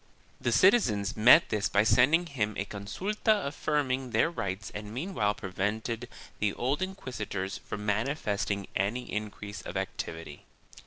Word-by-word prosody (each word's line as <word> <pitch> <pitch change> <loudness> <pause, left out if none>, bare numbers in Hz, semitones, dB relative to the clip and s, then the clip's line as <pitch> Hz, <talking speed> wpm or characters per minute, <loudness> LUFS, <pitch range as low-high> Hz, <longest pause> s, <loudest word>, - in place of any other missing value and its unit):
3 - - -18
The 120 - +3
citizens 115 - +4
met 120 +9 +7
this 105 -1 0
by 100 - +4
sending 145 +10 +4
him 110 - -2
a 95 - -1
con 100 0 -8
sulta 210 - 0
affirming 140 -3 -1
their 160 +7 +2
rights 100 - -4
and 105 0 -6
meanwhile 120 - -1
prevented 110 +5 -3 0.3
the 105 -1 +1
old 135 +7 -1
inquisitors 110 - -4
from 105 0 -6
manifesting 105 -3 -1
any 105 +6 0
increase 105 -1 -5
of - - -5
activity. 80 -3 -5
110 Hz, 145 wpm, -29 LUFS, 100-140 Hz, 0.3 s, met